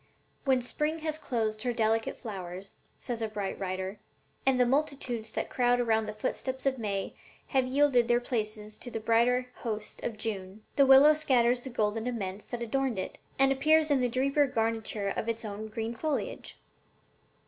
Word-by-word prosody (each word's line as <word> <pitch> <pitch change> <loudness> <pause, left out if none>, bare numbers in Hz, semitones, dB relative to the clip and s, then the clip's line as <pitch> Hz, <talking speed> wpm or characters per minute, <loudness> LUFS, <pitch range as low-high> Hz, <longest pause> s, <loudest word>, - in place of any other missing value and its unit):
'When 260 -2 +3
Spring 300 +5 -1
has 310 0 0
closed 220 -6 -2
her 245 +1 0
delicate 225 -1 0
flowers,' 190 -4 -7 0.2
says 240 -3 -4
a 225 - 0
bright 205 -2 -4
writer, 190 +1 -3 0.5
'and 260 -1 +4
the 250 - +5
multitudes 260 -5 -1
that - - -3
crowd 245 -1 +3
around 220 -2 +2
the 210 - -4
footsteps 260 +4 -3
of 265 -2 +1
May 200 -3 -2 0.4
have 265 -2 +2
yielded 260 -3 +3
their 240 0 +4
places 215 -3 -4
to 245 - -6
the 225 - -4
brighter 245 +3 +2
host 215 -3 -5
of 225 - -3
June, 210 -1 -5
the 275 -1 +5
willow 270 +3 +9
scatters 250 -5 +2
the 265 - -7
golden 220 -1 -1
aments 205 -5 -4
that 240 -1 -4
adorned 260 0 -1
it, 185 - -4 0.2
and 270 0 +5
appears 310 +3 +4
in 275 -2 +3
the 250 - +2
deeper 275 +4 +2
garniture 225 -4 -1
of 220 +3 -2
its 230 0 -3
own 210 +1 -5
green 225 +1 -4
foliage.' 295 +5 -3
235 Hz, 175 wpm, -29 LUFS, 215-260 Hz, 0.5 s, willow